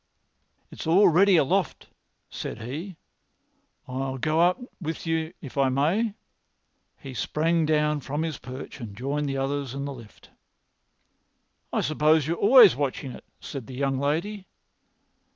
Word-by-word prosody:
"It's - - -7
all 185 +4 +6
ready 185 +3 +5
aloft," 175 +4 +1 0.4
said - - -6
he. 155 - -6 0.9
"I'll 130 +1 -3
go 155 +5 0
up 175 +2 +4 0.2
with 160 0 -4
you 160 0 -1
if 140 -1 -6
I 135 -1 +4
may." 180 - +1 0.8
He 135 -2 -9
sprang 160 +5 0
down 150 -1 +2
from 145 +3 -3
his 160 -3 -4
perch 130 +2 -9
and 105 -5 -8
joined 140 +4 -2
the 135 - -2
others 135 -1 -2
in 140 0 -3
the 140 - -4
lift. 115 -4 -15 1.4
"I - - 0
suppose 155 +1 +3
you 160 - 0
are - - -5
always 245 - +8
watching 135 -1 -3
it," - - -11
said 135 -6 -7
the 130 - -8
young 135 0 0
lady. 175 +8 -2
150 Hz, 150 wpm, -26 LUFS, 135-165 Hz, 1.4 s, always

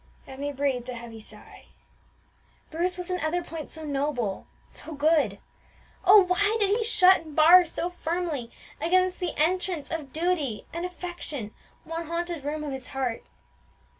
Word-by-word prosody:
Emmie 280 +2 -5
breathed 265 -3 -1
a 250 - -4
heavy 230 -1 -9
sigh. 215 - -12 1.1
Bruce 350 +3 -1
was 360 0 -5
in 365 - -1
other 345 +3 -1
points 325 -2 -7
so 320 - -8
noble, 275 -8 -2 0.2
so 320 - -8
good, 290 -8 +2 0.7
oh, 395 +2 +9
why 405 +4 +2
did 400 -2 +2
he 450 +3 +2
shut 380 -4 +6
and 310 -3 -12
bar 345 +3 +8
so 335 - -2
firmly 335 -7 -3 0.3
against 370 +2 +2
the 355 -3 -3
entrance 345 0 0
of 305 -5 -4
duty 315 -8 -1
and 340 +2 -3
affection 345 - -6 0.3
one 330 0 -5
haunted 340 -2 -3
room 300 +2 -3
of 295 - -4
his 265 -1 -6
heart! 255 -4 -3
325 Hz, 155 wpm, -27 LUFS, 280-360 Hz, 1.1 s, oh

